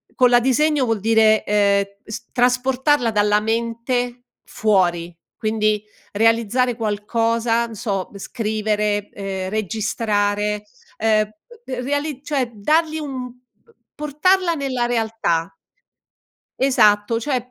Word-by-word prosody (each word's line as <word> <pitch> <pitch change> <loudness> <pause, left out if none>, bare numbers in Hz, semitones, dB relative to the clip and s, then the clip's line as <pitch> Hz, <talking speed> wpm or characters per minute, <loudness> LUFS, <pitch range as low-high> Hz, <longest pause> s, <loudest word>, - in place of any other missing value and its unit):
con 250 -1 +5
la 240 - +6
disegno 265 +3 +2
vuol 225 -3 0
dire, 220 0 +4
ehm, 200 -1 +2 0.2
s 220 +2 -9
trasportarla 255 +1 +2
dalla 210 0 +3
mente 235 +2 -2 0.2
fuori, 175 -5 0 0.2
quindi 215 -1 0 0.3
realizzare 230 +3 +2
qualcosa, 230 +2 0
n 225 - -10
so, 195 -3 -3
scrivere, 210 -1 -1
ehm, 190 -2 -5
registrare, 210 0 -1 0.3
uhm, 215 -1 +2 0.3
b - - -18
reali 285 0 -2
cioè 270 -5 -1
dargli 310 +9 +1
un 260 -4 -5
b 245 - -17 0.6
portarla 335 +4 +1
nella 260 -4 -1
realtà. 225 -8 -1 1.1
Esatto, 230 -3 +3
cioè 265 +1 0
225 Hz, 105 wpm, -21 LUFS, 210-250 Hz, 1.1 s, la